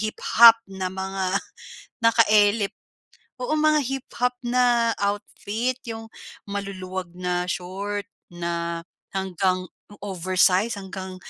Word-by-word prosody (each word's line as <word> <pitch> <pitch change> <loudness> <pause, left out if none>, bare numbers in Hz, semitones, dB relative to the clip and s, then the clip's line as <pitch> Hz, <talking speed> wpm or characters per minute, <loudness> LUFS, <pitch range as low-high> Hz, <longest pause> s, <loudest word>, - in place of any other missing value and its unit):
hip-hop 225 +1 +6
na 190 -1 -3
mga 190 0 -1 0.6
naka-elip. 215 -2 +4 0.7
Oo, 250 - -1
mga 305 0 +4
hip-hop 250 -1 -2
na 240 -1 +3
outfit, 205 +4 -2
yung 225 0 -6 0.4
maluluwag 190 -3 -5
na 180 0 -1
short 195 +3 -4 0.3
na 170 -1 -3 0.3
hanggang 185 -1 -1 0.3
oversized, 185 +3 +2
hanggang 190 -1 -7
200 Hz, 90 wpm, -24 LUFS, 185-230 Hz, 0.7 s, hip-hop